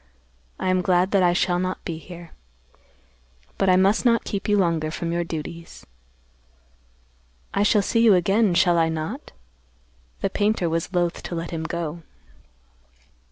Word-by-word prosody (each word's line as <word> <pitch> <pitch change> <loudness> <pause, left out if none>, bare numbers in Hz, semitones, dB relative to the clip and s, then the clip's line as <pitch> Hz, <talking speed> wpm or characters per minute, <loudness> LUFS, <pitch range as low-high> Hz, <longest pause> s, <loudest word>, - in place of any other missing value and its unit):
I 185 - 0
am 185 0 +2
glad 180 +1 +2
that 195 - +3
I 175 -1 +4
shall 175 0 +1
not 185 0 -4
be 165 -2 -4
here. 170 -1 -12 1.3
But 195 - +2
I 185 - +5
must 195 +3 +3
not 235 -2 +3
keep 200 0 -4
you 205 - +3
longer 165 -5 +1
from 165 +2 -4
your 170 0 -1
duties." 165 +1 -8 1.7
"I 200 - +1
shall 205 0 +3
see 230 +4 +1
you 225 -4 +6
again, 195 +2 +2
shall 175 -1 +3
I 165 0 +2
not?" 160 - -5 0.9
The - - -1
painter 205 -3 0
was 165 +2 -2
loath 175 -2 -1
to 175 - -6
let 165 0 -5
him 160 -1 -4
go. 170 0 -4
175 Hz, 160 wpm, -23 LUFS, 170-195 Hz, 1.7 s, you